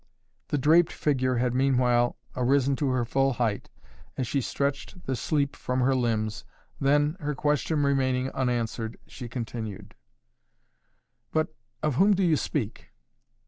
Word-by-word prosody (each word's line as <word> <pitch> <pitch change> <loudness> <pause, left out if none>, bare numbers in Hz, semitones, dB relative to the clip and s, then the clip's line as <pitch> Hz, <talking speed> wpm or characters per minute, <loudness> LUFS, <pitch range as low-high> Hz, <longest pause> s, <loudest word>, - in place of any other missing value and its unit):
The 145 - 0
draped 160 +5 +4
figure 130 -3 0
had 120 0 +1
meanwhile 125 -2 +2 0.2
arisen 135 +2 +2
to 145 -3 0
her 130 -2 +1
full 135 +3 +2
height, 115 -4 -1 0.5
as 130 - 0
she 135 +4 0
stretched 140 +7 -3
the 130 - -1
sleep 140 +3 0
from 125 0 -2
her 135 +2 +3
limbs, 110 -4 -1 0.4
then, 145 +4 +2
her 150 -2 -2
question 150 +1 +1
remaining 130 -2 +1
unanswered, 120 -3 -2
she 125 -2 -9
continued: 110 -4 -6 1.4
"But 155 0 0 0.3
of 150 -4 0
whom 200 +4 +5
do 190 - +1
you 165 -3 +4
speak? 130 -6 -3
130 Hz, 140 wpm, -27 LUFS, 120-145 Hz, 1.4 s, whom